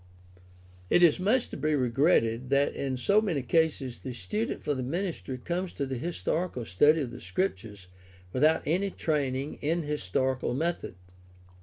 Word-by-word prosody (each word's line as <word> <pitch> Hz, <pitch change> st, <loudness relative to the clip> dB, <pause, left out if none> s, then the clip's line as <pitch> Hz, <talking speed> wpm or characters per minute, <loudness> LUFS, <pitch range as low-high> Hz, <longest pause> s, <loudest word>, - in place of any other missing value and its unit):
It 175 Hz, -, +5 dB
is 170 Hz, -1 st, +5 dB
much 225 Hz, +7 st, +2 dB
to -, -, -7 dB
be 155 Hz, +1 st, +1 dB
regretted 125 Hz, -2 st, +2 dB
that 140 Hz, +1 st, +2 dB
in 135 Hz, -2 st, -2 dB
so 200 Hz, +11 st, +3 dB
many 170 Hz, -, -1 dB
cases 145 Hz, -3 st, 0 dB
the 130 Hz, -, -6 dB
student 110 Hz, +1 st, -3 dB
for 145 Hz, -, 0 dB
the 130 Hz, -, -3 dB
ministry 160 Hz, -1 st, -3 dB
comes 175 Hz, +7 st, -3 dB
to 140 Hz, -, -2 dB
the 130 Hz, -2 st, -4 dB
historical 170 Hz, -4 st, -2 dB
study 150 Hz, -, +4 dB
of 125 Hz, -4 st, -3 dB
the 120 Hz, -, -9 dB
Scriptures 105 Hz, -, -3 dB, 0.5 s
without 155 Hz, +5 st, +3 dB
any 185 Hz, +6 st, +1 dB
training 140 Hz, -5 st, -2 dB
in 165 Hz, +3 st, 0 dB
historical 130 Hz, -2 st, -1 dB
method. 165 Hz, -, -2 dB
145 Hz, 155 wpm, -28 LUFS, 125-170 Hz, 0.5 s, It